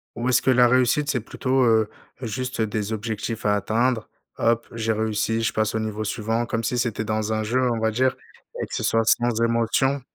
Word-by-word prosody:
Ou 120 +1 -3
est-ce 130 - +4
que - - 0
la 125 -1 +5
réussite 130 +4 +2
c'est 125 - +1
plutôt, 130 +3 0
heu, 110 -2 +3 0.3
juste, 125 +1 -3
des 110 0 -2
objectifs 110 +1 -4
à 105 0 +3
atteindre, 115 +3 0 0.3
hop, 115 0 +1
j'ai 115 -1 -1
réussi, 110 +1 0
je 110 - 0
passe 110 0 0
au - - +1
niveau 110 -1 -3
suivant 115 +2 -1
comme 115 -1 -2
si 125 +3 -1
c'était 115 -2 -1
dans 110 0 -1
un 110 0 -1
jeu, 125 +4 0
on 115 - -1
va 110 0 +1
dire, 130 +3 +1 0.5
et - - -1
que - - -12
ce - - -2
soit 115 0 +2
sans 120 0 +2
émotion? 115 +4 +1
115 Hz, 215 wpm, -23 LUFS, 110-125 Hz, 0.5 s, la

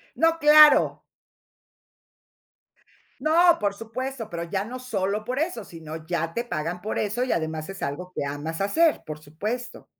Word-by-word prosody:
No, 330 0 +2
claro. 300 -1 +7 2.2
No, 340 +2 +4
por 200 -1 0
supuesto, 230 +2 -6
pero 170 -3 -5
ya 190 +3 -2
no 250 +3 -7
solo 210 -4 -2
por 250 +3 -3
eso, 300 - -2
sino 160 -1 -9
ya 165 -1 -2
te 235 - -2
pagan 170 -5 -4
por 215 - -3
eso, 210 +4 -1
y 255 - -1
además 160 0 -2
es 195 0 -8
algo 180 +6 -4
que - - -2
amas 150 +5 -5
hacer, 315 +11 +2
por 155 0 -7
supuesto. 215 +12 -5
205 Hz, 155 wpm, -25 LUFS, 165-255 Hz, 2.2 s, claro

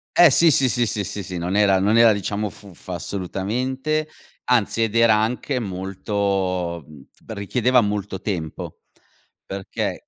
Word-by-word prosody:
Eh 175 -5 +7
sì, 165 +3 +5
sì, 135 -1 +3
sì, 120 -1 +1
sì, 105 -1 -2
sì, 100 +1 -5
sì 90 0 -6
non 90 +3 -2
era 100 -2 +4
non 105 +4 +2
era 115 -1 +7
diciamo 105 +1 -2
fuffa 95 -3 -11
assolutamente, 125 - -2 0.4
anzi, 115 -2 +2
ed 110 0 -2
era 115 -1 +5
anche 125 +5 -1
molto 95 -3 -2
mhmm, 75 -3 -14 0.2
richiedeva 120 +4 +1
molto 105 -2 -3
tempo, 85 -6 -5 0.7
perché 95 0 -5
105 Hz, 145 wpm, -22 LUFS, 95-115 Hz, 0.7 s, Eh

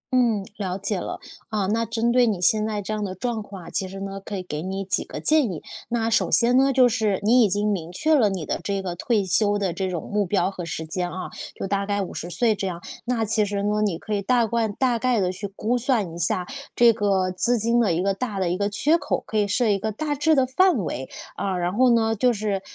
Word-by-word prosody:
嗯， 230 -6 +2
了 185 -3 -3
解 200 0 0
了。 - - -5 0.3
啊， 210 -3 -1
那 225 +3 0
针 230 +1 0
对 245 0 +4
你 200 -5 -1
现 215 +4 +4
在 215 -1 -2
这 210 +2 -4
样 215 - -3
的 190 -2 -4
状 230 +3 -3
况 195 -3 -10
啊， - - -7
其 190 - -1
实 195 +1 -8
呢， 195 0 -5
可 205 - -6
以 185 - -4
给 150 -4 -5
你 190 +3 -4
几 190 - 0
个 - - -7
建 305 -6 +4
议。 160 - -7 0.2
那 230 -1 -1
首 230 - +2
先 245 +2 +4
呢， 270 +1 +4
就 255 -1 +5
是， 220 -4 0
你 240 +4 +5
已 210 - +3
经 205 +2 +1
明 170 -5 -3
确 315 - +1
了 240 -9 +4
你 185 -5 -4
的 - - -2
这 200 -1 -2
个 185 -2 -4
退 205 +3 0
休 205 +3 +3
的 195 -3 -1
这 190 +2 -3
种 175 -3 -5
目 205 0 +1
标 190 +1 0
和 180 -3 -6
时 160 -1 -4
间 175 +2 -2
啊， 185 +1 -6 0.3
就 - - -5
大 200 +1 -1
概 205 0 -1
50 175 -2 -5
岁 225 +5 +2
这 195 -2 -3
样。 175 -2 -5 0.2
那 240 -2 0
其 215 0 +3
实 200 0 -2
呢， 210 +1 0
你 185 -6 -1
可 215 +5 -6
以 200 - 0
大 240 +3 +2
惯 225 -1 -1
大 245 0 0
概 245 -3 +1
地 180 -1 0
去 195 +2 -5
估 235 +4 0
算 230 -8 0
一 - - -8
下 175 +2 +1 0.3
这 240 -1 +6
个 195 -4 0
资 235 +7 +1
金 230 +2 +2
的 215 -7 +2
一 170 +2 0
个 195 0 +1
大 210 0 -4
的 185 -2 0
一 180 - -1
个 200 +1 0
缺 295 +11 +2
口， - - -2
可 220 - -3
以 205 -1 +2
设 220 +3 +2
一 200 -1 +2
个 215 +2 -3
大 295 +7 -2
致 295 +2 +2
的 265 -2 +3
范 350 +5 +3
围。 130 -4 -5 0.3
啊， 195 -2 -2
然 175 0 -1
后 255 +4 +4
呢， 225 -1 +2
就 245 +3 +2
是 205 -2 -2
205 Hz, 280 characters per minute, -23 LUFS, 190-235 Hz, 0.3 s, 这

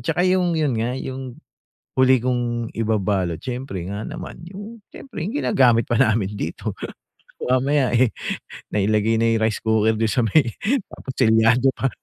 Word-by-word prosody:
tsaka 175 +9 0
yung 185 -2 +2
yun 150 -4 +1
nga, 115 +3 -1
yung 130 -1 -6 0.6
huli 130 0 +5
kong 120 -1 -1
ibabalot 100 -6 0
siyempre 125 -1 -5
nga 100 +2 -4
naman, 170 - -8
yung 205 +5 -10
siyempre 255 - -8
yung 200 - -3
ginagamit 125 - +3
pa 120 - 0
namin 105 -3 +2
dito. - - -4 0.7
Mamaya 130 0 +2
eh, 120 -1 +4 0.6
nailagay 105 +2 +1
na 115 +1 +2
yung 115 -1 +1
rice 110 - -3
cooker 110 0 +2
dun 110 0 0
sa 120 -3 +1
may, 140 +8 +4 0.5
tapos 130 - -8
selyado 115 +2 +4
pa. 135 - -1
120 Hz, 155 wpm, -22 LUFS, 110-135 Hz, 0.7 s, huli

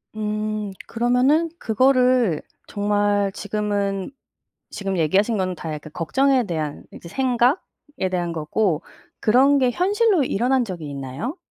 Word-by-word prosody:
음. 215 -1 -2 0.2
그러면은 250 +8 +2
그거를 250 - +3 0.3
정말 205 -1 +1
지금은 205 0 -2 0.6
지금 195 -2 -3
얘기하신 200 +8 +2
거는 185 -1 -1
다 160 -1 -5
약간 150 0 -8
걱정에 265 - +2
대한 155 -5 -4
이제 - - -11
생각에 255 - -1
대한 175 -2 -1
거고 165 +2 0 0.4
그런 265 +6 +5
게 255 -2 +3
현실로 390 - +2
일어난 250 +3 +1
적이 170 -7 -6
있나요? 140 - -5
210 Hz, 270 characters per minute, -22 LUFS, 185-255 Hz, 0.6 s, 그런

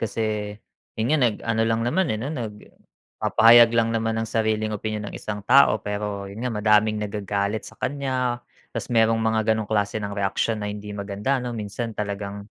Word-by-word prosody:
Kasi 105 -1 -2 0.4
yun 110 - 0
nga 155 - +4
nag-ano 115 -1 +1
lang 115 0 +1
naman, 185 +10 +1
eh, 110 - 0
no? 130 +8 -4
Nagpapahayag 115 -1 +2
lang 115 0 +2
naman 115 0 -1
ng 110 - -1
sariling 110 -1 0
opinyon 105 0 -3
ang - - -10
isang 105 -1 -6
tao. 135 -1 +6
Pero 105 -1 -3
yun 100 +3 -8
nga 125 +1 -2
madaming 105 0 +3
nagagalit 100 0 -2
sa 110 - -17
kanya, 130 -2 -2 0.3
tas - - -5
merong 115 -1 +3
mga 110 0 +2
ganong 110 -1 -2
klase 105 0 0
ng 100 -1 -4
reaksyon 100 +2 0
na 105 - -2
hindi 105 0 -6
maganda 105 +6 -2
ano 120 -1 -4
minsan 110 +1 -5
talagang 100 -1 -4
110 Hz, 175 wpm, -24 LUFS, 105-115 Hz, 0.4 s, tao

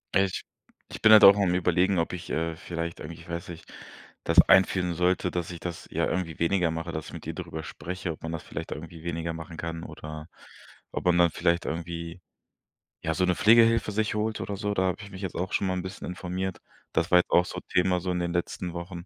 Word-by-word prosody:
Ich 95 -1 +2 0.5
ich - - -8
bin 110 - +8
halt 110 - +9
auch 100 +1 +10
am 95 -3 +2
Überlegen, 90 +1 +2
ob 80 - -1
ich, 90 - -6
äh, 80 0 -1
vielleicht 85 0 -5
eigentlich, 80 +2 -8
ich 85 - -15
weiß 85 +1 -5
nicht, 85 0 -10 0.5
das - - +7
einführen 90 -2 +4
sollte, 90 +1 +1
dass 90 -1 -3
ich 85 - -7
das, 85 -1 -6
ja, - - 0
irgendwie 90 -4 -3
weniger 85 0 +2
mache, 80 +1 -4
dass 80 -2 -5
ich - - -10
mit - - -8
ihr - - -4
darüber 80 - -6
spreche, 90 +4 -5
ob 80 - -10
man 80 - -4
das 80 - -4
vielleicht - - -7
irgendwie 80 +1 -8
weniger 85 -1 -3
machen 80 0 -8
kann, 80 0 -5
oder 75 0 -8 0.7
ob - - -4
man 90 -1 +4
dann 85 -1 +6
vielleicht 85 0 +1
irgendwie, 85 +1 -5 0.8
ja, 80 - -1
so 90 - 0
'ne 90 -1 +2
Pflegehilfe 115 0 +5
sich 110 0 0
holt 110 0 -1
oder 100 -1 -4
so, 105 0 -1
da 95 - +1
habe 95 -1 0
ich 100 - -10
mich 95 - -9
jetzt 95 -3 -4
auch 90 +1 -3
schon 100 - +1
mal 95 - 0
'n 90 - -2
bisschen 95 +2 -7
informiert. 90 +1 -4 0.4
Das - - 0
war 90 - +8
jetzt - - -1
auch 90 - +5
so - - -6
Thema, 90 0 +2
so 90 0 -2
in 90 - -1
den 85 0 -2
letzten 85 0 -3
Wochen, 85 0 -7
90 Hz, 235 wpm, -27 LUFS, 85-95 Hz, 0.8 s, auch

